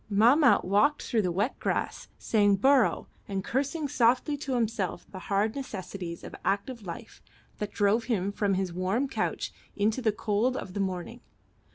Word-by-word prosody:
Mahmat 240 +8 +5
walked 210 +11 +2
through 230 -3 +1
the 180 -3 0
wet 205 +9 -1
grass - - -2
saying 205 -3 +3
bourrouh, 265 +3 +3 0.2
and 195 -1 -3
cursing 280 - -1
softly 255 +2 +2
to 275 -2 -3
himself 220 -7 -1
the 190 - -7
hard 205 +2 +1
necessities 190 -9 -6
of - - -9
active 220 +5 -1
life 170 - -8 0.4
that 210 -1 -3
drove 210 +3 +2
him 200 -5 0
from 200 -1 0
his 185 -2 -2
warm 190 +10 0
couch 270 - -2 0.2
into 215 +5 +1
the 225 -3 +2
cold 215 +5 0
of 185 - -6
the 200 - -4
morning. 190 +4 -3
210 Hz, 165 wpm, -28 LUFS, 195-255 Hz, 0.4 s, Mahmat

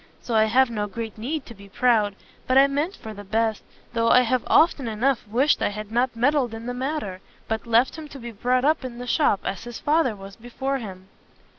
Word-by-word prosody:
So 240 - -5
I 220 -1 +5
have 245 +3 +3
no 210 -2 -2
great 220 +1 -6
need 265 +6 -4
to 235 - -10
be 200 -2 -15
proud. 215 -2 +2 0.3
But 255 - +3
I 270 - +8
meant 290 +7 -1
for 220 - -9
the 205 0 -9
best, 220 +2 0 0.3
though 230 -1 +2
I 250 - +7
have 250 0 +1
often 300 -6 +4
enough 230 +2 0
wished 255 +8 +2
I - - +2
had 210 +1 -7
not 240 +1 +1
meddled 250 -1 +1
in 225 +1 -8
the 245 - -3
matter, 250 -8 -4 0.3
but 220 +1 -3
left 235 +7 +2
him 310 - -8
to 285 - -11
be 235 -2 -7
brought 250 +4 0
up 310 -1 +2
in 245 -2 -6
the 245 - -6
shop, 250 -6 +2
as 195 - -3
his 240 -1 -7
father 300 -6 +1
was 195 0 -11
before 265 +4 -3
him." 190 -5 -9
235 Hz, 230 wpm, -24 LUFS, 215-265 Hz, 0.3 s, I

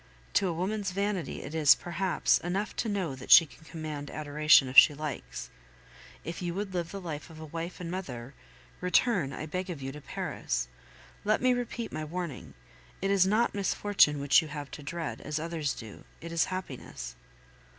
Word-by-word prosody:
To 195 - +3
a 175 - -1
woman's 200 +4 -2
vanity 195 -3 -2
it 145 - -7
is, 155 -3 +6
perhaps, 175 +2 +1
enough 190 +4 -2
to 225 - -1
know 190 -8 -1
that 130 0 -10
she 165 - +10
can 160 - -18
command 155 -3 -6
adoration 150 -2 +4
if 130 - -7
she 145 - +9
likes. 135 - -6 0.7
If 165 +2 -6
you 175 -1 -3
would 200 -1 -3
live 170 -2 -2
the 200 - -5
life 160 -5 -6
of 160 -1 -12
a 160 - -7
wife 165 +3 -6
and 170 -1 -5
mother, 135 -9 -6 0.5
return, 180 - +2
I 155 - -5
beg 185 +4 -4
of 170 -5 -5
you, 135 0 -5
to 150 +2 -10
Paris. - - -3 0.6
Let 215 +1 +2
me 255 0 +3
repeat 240 -1 -3
my 155 0 -4
warning: 170 -1 -5 0.4
It 195 +1 0
is 190 -2 +4
not 220 +4 +2
misfortune 200 -6 +3
which 140 +3 +5
you 160 - -7
have 145 -2 -7
to - - -8
dread, 165 +3 -5
as 150 - -3
others 160 -3 -2
do 110 -3 -10 0.2
it 170 - -8
is 165 -2 +2
happiness. 130 - -6
165 Hz, 190 wpm, -29 LUFS, 150-190 Hz, 0.7 s, she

